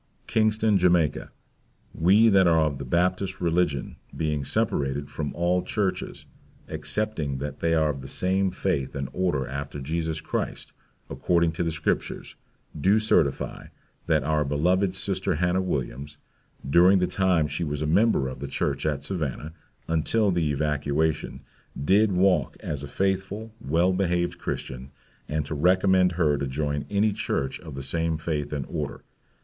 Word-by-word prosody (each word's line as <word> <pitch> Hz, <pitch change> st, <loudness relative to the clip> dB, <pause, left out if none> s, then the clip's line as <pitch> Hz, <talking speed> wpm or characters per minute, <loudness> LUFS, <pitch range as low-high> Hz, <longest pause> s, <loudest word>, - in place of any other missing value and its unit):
Kingston, 110 Hz, -2 st, +2 dB
Jamaica, 85 Hz, -4 st, +2 dB, 0.6 s
we 100 Hz, +7 st, +5 dB
that 95 Hz, -3 st, +5 dB
are 80 Hz, -1 st, +4 dB
of 75 Hz, -3 st, 0 dB
the 70 Hz, -, -5 dB
Baptist 90 Hz, +6 st, 0 dB
Religion, 85 Hz, -4 st, 0 dB, 0.2 s
being 75 Hz, -3 st, -1 dB
separated 70 Hz, +1 st, -1 dB
from 75 Hz, -2 st, -3 dB
all 90 Hz, +1 st, +1 dB
churches, 100 Hz, -2 st, -3 dB, 0.4 s
excepting 85 Hz, -11 st, -2 dB
they 75 Hz, +4 st, -1 dB
are 80 Hz, -1 st, +2 dB
of 70 Hz, -2 st, -7 dB
the 65 Hz, -, -8 dB
same 95 Hz, +4 st, +1 dB
faith 90 Hz, -8 st, -2 dB
and 70 Hz, -2 st, -3 dB
order 85 Hz, -8 st, 0 dB
after 70 Hz, +2 st, -5 dB
Jesus 80 Hz, +3 st, -2 dB
Christ, -, -, -4 dB, 0.3 s
according 85 Hz, -2 st, +1 dB
to 80 Hz, -, -4 dB
the 85 Hz, -, +1 dB
scriptures, 80 Hz, -1 st, -2 dB, 0.4 s
do 95 Hz, +8 st, +3 dB
certify, 110 Hz, 0 st, +1 dB, 0.4 s
that 80 Hz, -4 st, +2 dB
our 75 Hz, +1 st, +1 dB
beloved 90 Hz, +7 st, +1 dB
Sister 95 Hz, -2 st, 0 dB
Hannah 90 Hz, +3 st, +1 dB
Williams, 70 Hz, -4 st, -4 dB, 0.5 s
during 90 Hz, +7 st, +6 dB
the 90 Hz, -, +2 dB
time 90 Hz, -3 st, +2 dB
she 75 Hz, +3 st, -3 dB
was 75 Hz, -1 st, -2 dB
a -, -, -1 dB
member 85 Hz, -3 st, +3 dB
of 65 Hz, 0 st, -7 dB
the 70 Hz, -, -5 dB
Church 70 Hz, -, -1 dB
at 70 Hz, -2 st, -1 dB
Savannah, 80 Hz, -3 st, -4 dB, 0.3 s
until 95 Hz, +6 st, +2 dB
the 85 Hz, -4 st, 0 dB
evacuation, 75 Hz, +1 st, -1 dB, 0.4 s
did 100 Hz, +9 st, +3 dB
walk 90 Hz, -5 st, +2 dB
as 75 Hz, -2 st, -4 dB
a 70 Hz, -, -5 dB
faithful, 95 Hz, +6 st, -2 dB
well 85 Hz, +7 st, +2 dB
behaved 90 Hz, -2 st, 0 dB
Christian, 65 Hz, +1 st, -5 dB, 0.4 s
and 75 Hz, -1 st, -1 dB
to 75 Hz, -, -5 dB
recommend 95 Hz, +3 st, +3 dB
her 75 Hz, -4 st, +1 dB
to 70 Hz, -, -2 dB
join 70 Hz, +1 st, -2 dB
any 105 Hz, +1 st, +2 dB
church 85 Hz, -10 st, -2 dB
of -, -, -10 dB
the 70 Hz, -, -5 dB
same 80 Hz, +3 st, -1 dB
faith 75 Hz, -2 st, -3 dB
and 70 Hz, -3 st, -3 dB
order. -, -, -5 dB
80 Hz, 155 wpm, -26 LUFS, 75-95 Hz, 0.6 s, during